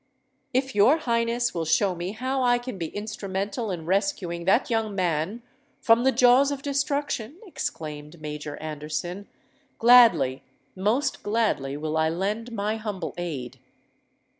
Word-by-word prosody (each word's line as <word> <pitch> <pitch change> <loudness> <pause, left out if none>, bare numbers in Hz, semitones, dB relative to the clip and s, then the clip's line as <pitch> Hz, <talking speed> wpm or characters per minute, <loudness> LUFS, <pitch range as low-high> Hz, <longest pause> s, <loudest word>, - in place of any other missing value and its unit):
"If 265 0 0
your 210 +10 +5
Highness 235 -4 0
will 170 - -2
show 195 +4 +2
me 175 +3 -5
how 260 +4 -2
I 245 -1 +4
can 240 -5 -7
be 165 - -2
instrumental 205 +2 -4
in 170 -4 -4
rescuing 180 -2 -1
that 200 +7 +3
young 220 -3 0
man 180 +5 -1 0.4
from 230 +1 +4
the 265 - +5
jaws 255 +2 +5
of 280 -1 -4
destruction," 280 -2 -2
exclaimed 155 - -6
Major 150 -1 -6
Anderson, 155 +5 -5 0.5
"gladly—most 225 - +3
gladly 205 -11 0
will 155 +1 -2
I 160 0 +2
lend 205 +8 -2
my 215 0 -2
humble 205 -5 -5
aid." 155 -8 -5
205 Hz, 135 wpm, -25 LUFS, 170-240 Hz, 0.5 s, your